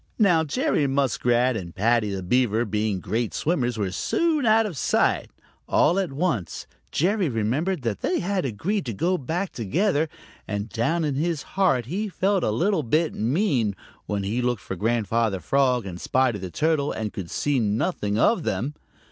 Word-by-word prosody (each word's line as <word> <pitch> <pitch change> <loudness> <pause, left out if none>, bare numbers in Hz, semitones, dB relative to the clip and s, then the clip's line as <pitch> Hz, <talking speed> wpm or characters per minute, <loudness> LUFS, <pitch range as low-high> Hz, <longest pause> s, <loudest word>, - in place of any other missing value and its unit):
Now 180 -7 +4
Jerry 160 - +1
Muskrat 130 -2 +2
and 90 -5 -6
Paddy 110 +1 +2
the 95 -1 -4
Beaver, 120 +2 +2
being 105 -2 -1
great 110 +5 -2
swimmers, 125 -8 0
were 100 -3 -1
soon 310 - +1
out 220 +1 +5
of 195 -6 -4
sight. - - +1 0.4
All 175 +6 +3
at 190 -6 -1
once 135 - -2 0.3
Jerry 185 +1 +1
remembered 135 - -1
that 115 -4 -2
they 185 - 0
had 190 0 -1
agreed 140 - -2
to 115 - -2
go 175 - +1
back 170 +8 -2
together, 155 - 0 0.4
and 105 +1 -3
down 160 +11 0
in 145 - 0
his 155 +2 -1
heart 135 - +2
he 200 - -3
felt 195 0 +1
a - - +2
little 175 - +1
bit 155 +6 +1
mean 125 - +1 0.3
when 100 -1 -2
he 110 +6 -1
looked 120 -4 -1
for 95 - -5
Grandfather 110 0 0
Frog 125 - +1
and 90 -2 -7
Spotty 130 -5 +1
the 95 -1 -5
Turtle 150 - +1
and 110 -1 -4
could 90 -4 -6
see 145 -2 0
nothing 105 - 0
of 190 - +3
them. 110 +4 -2
130 Hz, 175 wpm, -24 LUFS, 110-170 Hz, 0.4 s, out